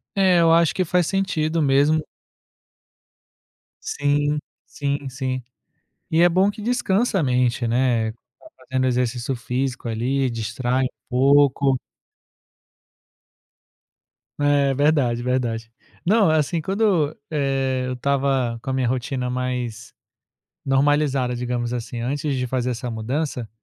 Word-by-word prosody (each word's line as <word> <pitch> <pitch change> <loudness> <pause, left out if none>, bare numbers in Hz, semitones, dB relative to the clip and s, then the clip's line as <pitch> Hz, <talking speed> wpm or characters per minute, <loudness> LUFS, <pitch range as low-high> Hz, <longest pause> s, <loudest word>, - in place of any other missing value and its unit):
É, 185 -3 +4
eu 165 -1 +5
acho 165 -1 +4
que 185 - 0
faz 180 -1 +1
sentido 165 -5 0
mesmo 145 +3 +3 1.8
Sim, 145 +1 0 0.3
sim, 140 -1 -3
sim. 130 -1 -3 0.7
E 160 +1 +3
é 175 - +6
bom 185 +4 +3
que 210 +1 -7
descansa 225 -2 +1
a - - +1
mente, 125 -2 +1
né, 120 -2 +1
ficar 120 - -21
fazendo 130 -1 -1
exercício 125 +1 -1
físico 125 +1 -3
ali, 130 +4 0
distrai 120 +3 -1
um - - +1 0.2
pouco. 140 +1 +4 2.6
É, 145 -1 +2
verdade, 140 -4 +2
verdade. 120 -3 -2 0.3
Não, 200 -1 +4
assim, 160 +2 +1
quando, 190 -5 +1
eh, 135 -3 0
eu 130 - -2
estava 135 -2 0
com 125 - -6
a - - 0
minha 130 -2 0
rotina 125 +1 -2
mais 125 -3 -4 0.7
normalizada, 135 -2 +2
digamos 120 -1 -2
assim, 120 0 -5
antes 140 +4 -2
de 125 -1 -2
fazer 125 0 -1
essa 125 +1 -4
mudança, 120 +2 -3
135 Hz, 120 wpm, -22 LUFS, 125-150 Hz, 2.6 s, é